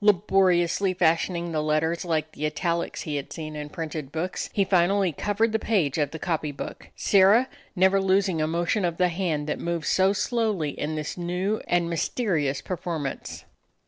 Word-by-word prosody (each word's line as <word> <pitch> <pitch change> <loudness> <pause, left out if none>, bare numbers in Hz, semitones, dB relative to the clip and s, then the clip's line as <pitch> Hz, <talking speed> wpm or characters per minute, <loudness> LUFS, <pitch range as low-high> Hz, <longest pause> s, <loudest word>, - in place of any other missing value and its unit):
Labo 195 -1 +4
riously 180 +2 +1
fashioning 170 0 +1
the 155 -1 0
letters 155 +2 0
like 160 -3 -1
the 155 0 -2
italics 170 +2 -2
he 150 -3 -3
had 140 - -6
seen 155 -2 -6
in 150 0 -5
printed 155 -3 -5
books, 170 +4 -3
he 200 - +1
finally 190 0 +3
covered 210 +8 0
the 220 - +1
page 170 - +1
of 145 - +1
the 160 - -7
copy 160 -3 -2
book, 140 - -8
Sirrah 205 +6 +5 0.3
never 190 +1 +4
losing 190 -3 +2
a 155 - +1
motion 170 +5 0
of 170 -2 -1
the 180 -1 +3
hand 165 -4 -1
that 150 - -3
moved 170 -2 -2
so 190 +1 +3
slowly 205 - 0
in 155 +2 -3
this 155 +2 -4
new 180 +5 -1
and 175 -1 +2
mysterious 165 - -1
performance. 165 -6 -4
170 Hz, 175 wpm, -25 LUFS, 155-190 Hz, 0.3 s, Sirrah